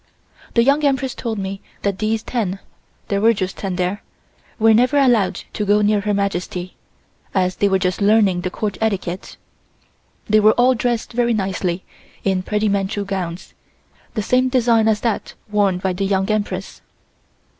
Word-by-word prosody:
The 235 - +5
Young 280 +4 +3
Empress 265 -2 +1
told 225 -3 -4
me 195 0 -4 0.2
that 200 -2 -1
these 220 +1 0
ten 205 -6 -2 0.5
(there 200 -1 0
were 225 +1 +5
just 190 -1 -3
ten 190 -2 -4
there) 180 +3 -1 0.6
were 225 0 +5
never 250 +6 +3
allowed 225 -9 +3
to 210 - -2
go 205 +1 +3
near 205 0 +2
Her 210 +1 -1
Majesty, 180 -2 -3 0.6
as 185 -1 +1
they 200 - +2
were 190 - +3
just 185 +1 -1
learning 200 -3 +3
the 185 - -2
court 205 +2 -4
etiquette. 190 -4 -2 0.9
They 215 0 +4
were 215 +1 +5
all 250 +1 +4
dressed 240 -1 -2
very 240 -1 +2
nicely 190 -3 -2 0.4
in 190 -2 +1
pretty 210 +3 0
Manchu 200 0 -1
gowns, 185 -3 -5 0.6
the 215 - -1
same 255 +4 +2
design 235 -3 +3
as 215 -2 +2
that 230 -3 -2 0.2
worn 200 -3 +2
by 185 0 -1
the 195 +2 -2
Young 195 +1 +1
Empress. 200 -3 -3
205 Hz, 165 wpm, -20 LUFS, 190-225 Hz, 0.9 s, The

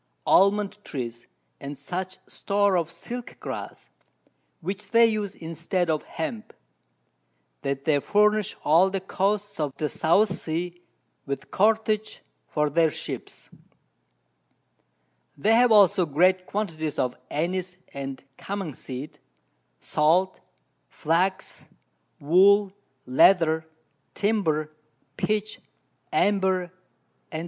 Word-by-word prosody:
Almond 205 +1 +3
trees, 120 -4 -6 0.3
and 140 +1 -7
such 185 +1 -5
Store 200 -1 +1
of 170 -2 0
Silk 240 +7 -8
grass, - - -7 0.7
which 190 +4 -5
they 230 0 +6
use 215 -3 -1
instead 165 +2 -2
of 155 - 0
Hemp, 215 +7 -6 1.1
that 140 0 -3
they 150 -3 +3
furnish 210 +4 +2
all 170 +6 +5
the 195 0 -2
Coasts 200 +1 -2
of 145 -3 -2
the 150 - -1
South 175 +8 +2
Sea 175 +1 -4 0.5
with 140 0 -5
Cordage 215 +1 +1 0.3
for 150 -1 0
their 165 +1 +3
Ships; - - -8 1.9
they 215 +10 +3
have 240 +1 +5
also 195 -4 +5
great 185 +5 +2
Quantities 160 -8 -3
of 125 0 0
Annise 180 +3 -2 0.2
and 135 -1 -6 0.2
Cummin 195 -6 -4
seed, 140 +5 -8 0.6
Salt, 175 +5 +1 0.5
Flax, 180 +4 -1 0.5
Wool, 195 +6 +4 0.3
Leather, 160 +3 +4 0.5
Timber, 165 -8 0 0.4
Pitch, 215 +4 -2 0.5
Amber, 190 -3 +1 0.6
_&c. 155 - -3
180 Hz, 105 wpm, -25 LUFS, 155-205 Hz, 1.9 s, they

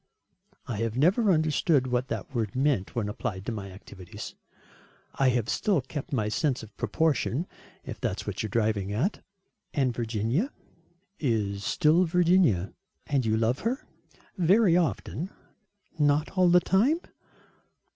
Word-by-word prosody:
"I 115 - -4
have 115 +1 -2
never 195 - +4
understood 155 -3 +2
what 125 0 -1
that 140 - -5
word 115 -4 -2
meant 130 -8 0
when 115 -4 -1
applied 105 -2 -4
to 120 - -2
my 100 -3 -5
activities. 95 -1 -10 0.8
I 135 -1 +3
have 120 -3 0
still 195 - +1
kept 135 +2 -6
my 110 -6 0
sense 130 +3 0
of 110 - -13
proportion, 145 - 0 0.4
if - - -8
that - - -1
is - - -12
what - - -3
you 110 - -2
are - - -10
driving 105 -2 0
at?" 135 - -1 0.5
"And 130 -4 +2
Virginia?" 115 - -1 0.7
"Is 105 -7 -1
still 165 +4 +3
Virginia." 170 - +3 0.3
"And 135 -5 0
you 110 0 +2
love 115 +4 +1
her?" 245 +5 -2 0.5
"Very 185 +1 +5
often." 175 0 -1 0.7
"Not 145 +1 +2
all 185 -2 +4
the 180 +1 +7
time?" 255 - +2
130 Hz, 145 wpm, -27 LUFS, 110-170 Hz, 0.8 s, the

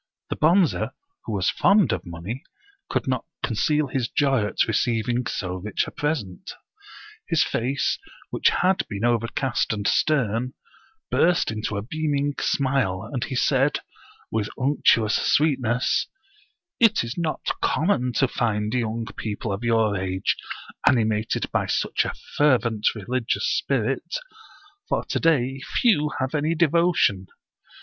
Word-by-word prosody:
The - - 0
Bonze, 170 +2 +4 0.5
who - - -4
was 100 -3 +1
fond 200 0 +4
of 90 +1 -3
money, 85 +10 -6 0.5
could - - -1
not 130 -2 0 0.2
conceal 150 +7 +1
his 125 -3 -2
joy 135 -8 +2
at - - +1
receiving 120 +2 0
so 90 -3 -3
rich 100 +3 -2
a - - -8
present. 130 - -3 0.8
His - - +3
face, 130 +4 -1 0.3
which - - +3
had 190 +1 +2
been 105 +2 -2
overcast 120 +3 0
and 105 -1 -2
stern, 125 -4 +1 0.6
burst 175 -6 +3
into 110 -1 -3
a 100 - -3
beaming 145 +2 -1
smile, 130 -8 0
and 125 -2 -1
he 130 - -5
said, 135 +2 +2 0.5
with 110 -2 -1
unctuous 130 -5 +3
sweetness: 130 -5 +2 0.4
" - - -36 0.3
It 225 - +4
is 115 +2 -5
not 165 -3 -2
common 145 -7 +1
to 135 +4 +3
find 105 -3 -1
young 115 -2 -1
people 105 -1 -3
of 100 +4 -5
your 115 -3 +2
age 95 0 -1 0.5
animated 110 -3 +1
by - - 0
such - - 0
a - - -4 0.2
fer 145 -3 +5
vent 115 -3 -2
religious 115 +3 -1
spirit, - - -1 0.7
for - - 0
to - - -1
day 135 -4 +1 0.2
few 170 -11 +3
have 130 +1 -2
any 155 +2 +1
devotion. 170 - +2
125 Hz, 140 wpm, -24 LUFS, 110-145 Hz, 0.8 s, fer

